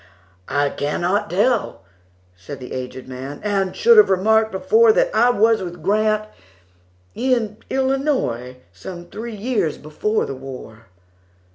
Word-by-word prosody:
"I 145 0 +1
cannot 175 +7 -1
tell," 210 - 0 0.5
said 125 +11 -9
the 125 - -8
aged 130 0 -6
man,"And 145 +10 -3
should 465 0 +5
have 430 - +7
remarked 220 +4 +3
before, 440 - +4
That - - +2
I 240 - +5
was 225 -1 +3
with 175 -3 -7
Grant,—in 205 - -3
Illinois,—Some 175 - -3
three 230 0 -6
years 205 - -1
before 210 +9 -2
the - - -5
war." 130 -4 -10
190 Hz, 115 wpm, -20 LUFS, -, 0.5 s, have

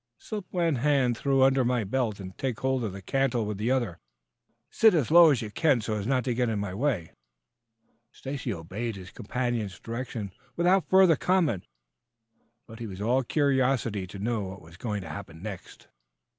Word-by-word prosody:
"Slip 210 -3 -6
one 170 -6 +1
hand 135 -2 +2
through 135 +2 +2
under 135 0 +4
my 120 -1 +1
belt 110 0 -1
and 95 -1 -8
take 130 -5 -3
hold 130 -1 0
of 110 - -2
the 95 0 -9
cantle 130 -1 0
with 105 -1 -4
the 110 +3 0
other. 120 -10 0 0.7
Sit 220 -4 +5
as 150 -3 +1
low 170 0 +9
as 130 -6 +1
you 105 - -6
can 145 0 +3
so 110 0 -3
as 105 0 -3
not 130 -1 +2
to 125 - -1
get 120 0 0
in 110 - -1
my 100 -2 -3
way." 110 - -1 1.0
Stacy 135 -2 -5
obeyed 100 +6 -4
his 95 0 -10
companion's 120 -4 -3
directions 115 -3 -5 0.2
without 180 +2 +2
further 190 -3 +6
comment, 160 - +1 1.0
but 115 0 -12
he 115 - -5
was 95 -2 -8
all 120 +6 +2
curiosity 130 -7 +1
to 95 - -9
know 110 +2 -1
what 95 0 -7
was 80 +1 -14
going 105 +2 -3
to - - -8
happen 95 -4 -8
next. 105 -4 -8
120 Hz, 185 wpm, -27 LUFS, 100-135 Hz, 1.0 s, low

